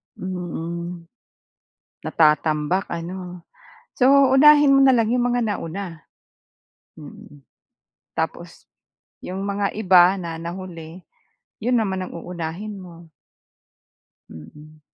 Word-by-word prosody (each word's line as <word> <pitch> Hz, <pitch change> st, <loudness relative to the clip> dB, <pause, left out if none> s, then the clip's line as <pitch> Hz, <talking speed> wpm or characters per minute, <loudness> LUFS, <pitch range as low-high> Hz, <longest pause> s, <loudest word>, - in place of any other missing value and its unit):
Mm. 175 Hz, -1 st, -6 dB, 1.0 s
Natatambak 155 Hz, +3 st, +1 dB
ano? 175 Hz, +1 st, -7 dB, 0.5 s
So 270 Hz, +1 st, +5 dB
unahin 290 Hz, 0 st, +6 dB
mo -, -, +4 dB
na 265 Hz, -, +5 dB
lang 230 Hz, -2 st, +2 dB
'yong 245 Hz, 0 st, +1 dB
mga 245 Hz, -, +1 dB
nauna. 170 Hz, -3 st, -6 dB, 0.9 s
Mhm. 145 Hz, -1 st, -14 dB, 0.7 s
Tapos -, -, -5 dB, 0.5 s
'yong 190 Hz, +2 st, -6 dB
mga 200 Hz, 0 st, -2 dB
iba 185 Hz, -3 st, +5 dB
na 170 Hz, -4 st, -6 dB
nahuli 170 Hz, 0 st, -8 dB, 0.6 s
'yon 245 Hz, +1 st, +2 dB
naman 190 Hz, -4 st, -2 dB
ang -, -, -8 dB
uunahin 175 Hz, +5 st, -6 dB
mo. 175 Hz, -3 st, -12 dB, 1.2 s
Mhm. 155 Hz, +1 st, -14 dB
180 Hz, 95 wpm, -22 LUFS, 165-205 Hz, 1.2 s, unahin